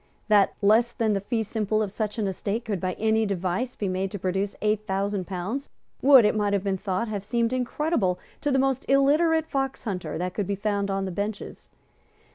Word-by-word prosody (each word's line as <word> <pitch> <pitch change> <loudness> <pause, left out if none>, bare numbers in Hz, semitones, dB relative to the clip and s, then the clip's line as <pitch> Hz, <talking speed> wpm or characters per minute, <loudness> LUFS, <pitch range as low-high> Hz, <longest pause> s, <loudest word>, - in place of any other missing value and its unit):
That 205 -2 +4
less 225 +4 +4
than 225 -3 +1
the 195 - -1
fee 225 +2 -1
simple 215 0 0
of 200 - -4
such 210 +1 -3
an 215 - 0
estate 200 +4 -3
could, 205 -4 -2
by 185 -1 -1
any 220 +2 +1
device, 195 +4 -2
be 205 - -2
made 190 +1 -1
to 205 - -5
produce 190 +2 -2
eight 215 0 0
thousand 195 -1 -1
pounds, 200 +9 -4 0.3
would, 265 -4 +8
it 210 - +3
might 205 -1 +1
have 200 -2 +1
been 195 -2 -1
thought, 195 +3 -2
have 205 -3 -4
seemed 235 +3 0
incredible 250 - 0 0.2
to 290 - 0
the 270 - +3
most 265 -1 +1
illiterate 305 +4 +4
foxhunter 265 - -3
that 180 +2 -3
could 205 -3 -2
be 200 - -1
found 200 0 -1
on 195 0 -1
the 190 - -4
benches. 200 +3 -5
210 Hz, 205 wpm, -26 LUFS, 195-235 Hz, 0.3 s, would